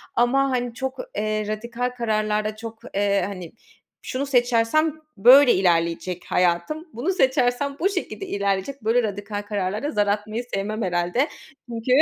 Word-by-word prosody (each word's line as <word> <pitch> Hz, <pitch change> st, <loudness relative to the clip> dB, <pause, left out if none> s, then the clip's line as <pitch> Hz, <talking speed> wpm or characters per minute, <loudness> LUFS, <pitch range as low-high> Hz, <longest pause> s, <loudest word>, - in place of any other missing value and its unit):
ama, 270 Hz, +3 st, +3 dB
hani, 245 Hz, -2 st, -1 dB
çok, 265 Hz, +2 st, -4 dB, 0.2 s
eee, 215 Hz, 0 st, -1 dB
radikal 235 Hz, +3 st, -3 dB
kararlarda 215 Hz, -2 st, 0 dB
çok, 225 Hz, 0 st, -8 dB, 0.2 s
eee, 200 Hz, -1 st, +2 dB
hani, 185 Hz, -4 st, -7 dB, 0.5 s
şunu 265 Hz, +2 st, -3 dB
seçersem 250 Hz, +4 st, +2 dB, 0.2 s
böyle 250 Hz, +5 st, +8 dB
ilerleyecek 175 Hz, 0 st, +1 dB
hayatım, 180 Hz, -, 0 dB
bunu 255 Hz, +11 st, -1 dB
seçersem 265 Hz, -3 st, +1 dB
bu 385 Hz, -, +2 dB
şekilde 390 Hz, 0 st, -4 dB
ilerleyecek, 200 Hz, -, -2 dB
böyle 230 Hz, +3 st, +3 dB
radikal 205 Hz, 0 st, -4 dB
kararlarda 205 Hz, +6 st, -2 dB
zar 205 Hz, -1 st, +1 dB
atmayı 215 Hz, +3 st, -1 dB
sevmem 210 Hz, +3 st, -2 dB
herhâlde. 180 Hz, -, +1 dB, 0.4 s
Çünkü 230 Hz, +1 st, -3 dB
220 Hz, 135 wpm, -23 LUFS, 200-255 Hz, 0.5 s, böyle